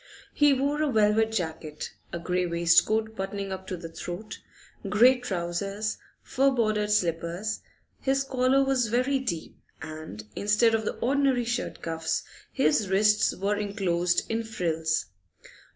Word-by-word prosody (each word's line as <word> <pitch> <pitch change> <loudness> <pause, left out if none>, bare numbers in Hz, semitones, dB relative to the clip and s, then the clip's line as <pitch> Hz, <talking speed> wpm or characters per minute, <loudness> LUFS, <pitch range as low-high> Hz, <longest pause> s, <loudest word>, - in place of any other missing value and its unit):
He 295 -1 +5
wore 280 +3 +1
a 300 -2 +1
velvet 220 0 +3
jacket, 160 -6 -4 0.2
a - - -3
grey 180 +1 -1
waistcoat 175 +6 +3
buttoning 195 0 -4
up 190 0 -6
to 185 - -4
the 165 0 -7
throat, 175 +5 -7 0.5
grey 250 +4 +5
trousers, 195 0 -3 0.2
fur 275 +1 +2
bordered 215 -5 +1
slippers; 175 +1 0 0.4
his 270 0 +1
collar 265 0 +2
was 265 -3 +1
very 255 +5 +1
deep, 170 -12 -5 0.2
and 155 -9 -8
instead 210 +3 +3
of 220 -1 0
the - - -2
ordinary 265 -1 +1
shirt 240 +1 -3
cuffs, 165 -1 -2 0.3
his 170 +7 +2
wrists 210 +2 +3
were 200 +2 -1
enclosed 180 -4 0
in 225 +1 -1
frills. 160 -7 -1
210 Hz, 135 wpm, -27 LUFS, 175-240 Hz, 0.5 s, He